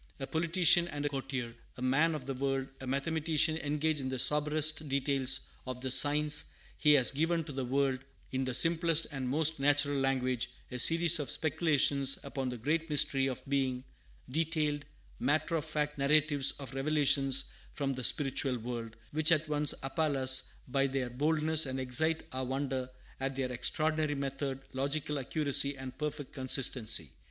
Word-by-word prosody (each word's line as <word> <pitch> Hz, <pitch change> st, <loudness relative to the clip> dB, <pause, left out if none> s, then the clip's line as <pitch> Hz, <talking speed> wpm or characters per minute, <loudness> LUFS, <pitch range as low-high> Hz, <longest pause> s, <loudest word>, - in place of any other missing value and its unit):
A 135 Hz, -, -3 dB
politician 170 Hz, +3 st, +3 dB
and 145 Hz, -3 st, -4 dB
a -, -, +1 dB
courtier, 135 Hz, -4 st, -4 dB, 0.2 s
a -, -, -9 dB
man 150 Hz, +6 st, +2 dB
of 140 Hz, -4 st, -7 dB
the 135 Hz, -, -3 dB
world, 135 Hz, 0 st, -2 dB
a 130 Hz, -, -8 dB
mathematician 155 Hz, +3 st, 0 dB
engaged 150 Hz, +1 st, -1 dB
in 130 Hz, -, -3 dB
the 130 Hz, -, -3 dB
soberest 150 Hz, +2 st, +1 dB
details 135 Hz, -1 st, +1 dB, 0.3 s
of 130 Hz, -1 st, -5 dB
the 130 Hz, 0 st, -2 dB
science, 145 Hz, +3 st, +4 dB, 0.3 s
he 150 Hz, -1 st, +4 dB
has 130 Hz, -4 st, +3 dB
given 165 Hz, +4 st, 0 dB
to 150 Hz, -, -8 dB
the 135 Hz, -2 st, -4 dB
world, 135 Hz, 0 st, 0 dB, 0.3 s
in 130 Hz, 0 st, -1 dB
the 130 Hz, -1 st, -2 dB
simplest 165 Hz, +1 st, +4 dB
and 135 Hz, -3 st, -4 dB
most 155 Hz, +2 st, +2 dB
natural 145 Hz, 0 st, +2 dB
language, 130 Hz, -2 st, 0 dB, 0.2 s
a 125 Hz, -, -3 dB
series 165 Hz, +4 st, +4 dB
of 145 Hz, -, -4 dB
speculations 145 Hz, -3 st, +2 dB
upon 135 Hz, -2 st, -4 dB
the 125 Hz, -, -5 dB
great 155 Hz, +7 st, -1 dB
mystery 135 Hz, -2 st, +2 dB
of 130 Hz, 0 st, -6 dB
being: 130 Hz, -2 st, -1 dB, 0.4 s
detailed, 150 Hz, 0 st, -1 dB, 0.3 s
matter 155 Hz, +4 st, 0 dB
of 155 Hz, -2 st, -2 dB
fact 150 Hz, -2 st, -2 dB
narratives 145 Hz, 0 st, +3 dB
of 135 Hz, -3 st, -8 dB
revelations 135 Hz, -1 st, +2 dB, 0.2 s
from 140 Hz, -1 st, -2 dB
the 130 Hz, -1 st, -6 dB
spiritual 135 Hz, -1 st, 0 dB
world, 115 Hz, -1 st, -6 dB, 0.2 s
which 155 Hz, +2 st, +2 dB
at 155 Hz, -1 st, +2 dB
once 150 Hz, -1 st, +1 dB
appall 145 Hz, +1 st, -1 dB
us 130 Hz, 0 st, +4 dB, 0.2 s
by 135 Hz, +1 st, +1 dB
their 130 Hz, -2 st, -3 dB
boldness, 155 Hz, +3 st, +1 dB
and 130 Hz, 0 st, -3 dB
excite 160 Hz, +6 st, 0 dB
our 130 Hz, 0 st, -3 dB
wonder 130 Hz, -1 st, -3 dB, 0.3 s
at 135 Hz, 0 st, -3 dB
their 130 Hz, -1 st, -2 dB
extraordinary 155 Hz, +4 st, 0 dB
method, 135 Hz, -1 st, -4 dB
logical 140 Hz, +2 st, -2 dB
accuracy, 140 Hz, 0 st, 0 dB
and 130 Hz, -1 st, -8 dB
perfect 150 Hz, -2 st, -5 dB
consistency. 125 Hz, -, 0 dB
140 Hz, 165 wpm, -31 LUFS, 130-155 Hz, 0.4 s, science